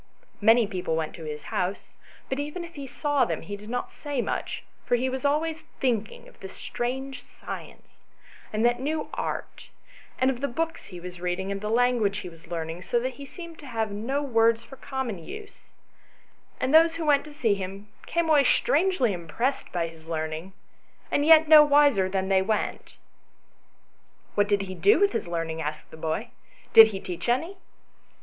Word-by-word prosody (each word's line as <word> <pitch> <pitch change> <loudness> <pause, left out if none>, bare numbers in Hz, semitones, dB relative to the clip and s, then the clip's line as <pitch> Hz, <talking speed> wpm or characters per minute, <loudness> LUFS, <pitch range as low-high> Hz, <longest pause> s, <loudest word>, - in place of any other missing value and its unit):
Many 225 +2 +6
people 180 -5 -2
went 160 -1 -2
to 165 - -9
his 150 -1 -6
house; 185 +2 -2 0.3
but 265 - -2
even 300 +5 -4
if 335 - -13
he 280 -2 -7
saw 290 +1 +1
them, 165 -3 -2
he 205 +5 -5
did 210 +2 -11
not 245 +1 -3
say 290 -3 -4
much, - - -3 0.2
for - - +2
he 255 +2 0
was 260 0 -4
always 315 +3 +1 0.2
think 230 -5 0
ing - - -13
of - - -19
this 190 0 -9
strange 265 +3 -4
science, - - -10 0.5
and 215 +2 +1
that 240 0 +3
new 305 +4 -2
art, - - -5 0.5
and 260 +1 +3
of 250 -1 -6
the 280 - +1
books 325 +5 -3
he 180 -3 -9
was 180 0 -9
reading, 180 +2 -2
and 195 0 -3
the 210 - -3
language 235 -4 +2
he 185 - -6
was 165 +1 -16
learning, 165 0 -4
so 240 +6 0
that 255 +2 -2
he 280 - -9
seemed 335 -1 -10
to 290 - -11
have 225 -3 -2
no 250 +8 -2
words 230 -3 +3
for 270 - -12
common 265 -7 -4
use, 420 - -10 0.9
and 260 +3 0
those 325 +1 +7
who 330 -1 -3
went 290 -2 +4
to 305 - -10
see 255 -8 +1
him 195 +1 -6 0.2
came 340 -1 0
away 300 -3 +5
strangely 360 - +2
impressed 185 - -2
by 170 -1 -1
his 165 -1 -14
learning, 160 +3 -4 0.6
and 290 +1 +2
yet 320 -1 +8
no 305 -1 +10
wiser 285 -10 +4
than 190 0 -1
they 190 -1 +4
went." 210 +2 -2 1.4
"What 205 0 +2
did 200 -1 +2
he 185 -1 -6
do 400 - +4
with 405 0 +4
his - - -2
learning?" 165 -1 -3
asked 150 0 -5
the - - -9
boy. 160 +9 -3 0.2
" - - -28
Did 225 -1 +11
he 200 -3 -5
teach 180 +4 -5
any 330 +11 0
230 Hz, 195 wpm, -26 LUFS, 185-285 Hz, 1.4 s, Did